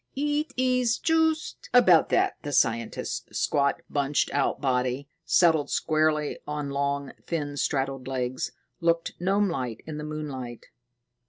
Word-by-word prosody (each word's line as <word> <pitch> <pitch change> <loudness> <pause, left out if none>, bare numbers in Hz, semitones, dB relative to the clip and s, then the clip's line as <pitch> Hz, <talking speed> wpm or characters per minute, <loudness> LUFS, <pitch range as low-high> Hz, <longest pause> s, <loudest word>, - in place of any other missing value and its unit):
"It 295 +2 0
is 250 -2 +2
just 320 -1 0
about 185 -10 +6
that." - - +2
The 145 - -5
scientist's 115 - 0
squat, 140 -1 +1
bunched 145 0 0
out 140 -1 +1
body, 130 +1 -1 0.2
settled 160 -4 +4
squarely 155 -1 +1
on 150 -1 -3
long, 140 0 -1 0.2
thin, 145 -4 -2
straddled 135 -2 -1
legs, 130 -1 -2 0.3
looked 170 -1 +1
gnomelike 175 - 0
in 155 -1 -6
the - - -5
moonlight. 140 -6 -6
150 Hz, 120 wpm, -27 LUFS, 135-175 Hz, 0.3 s, about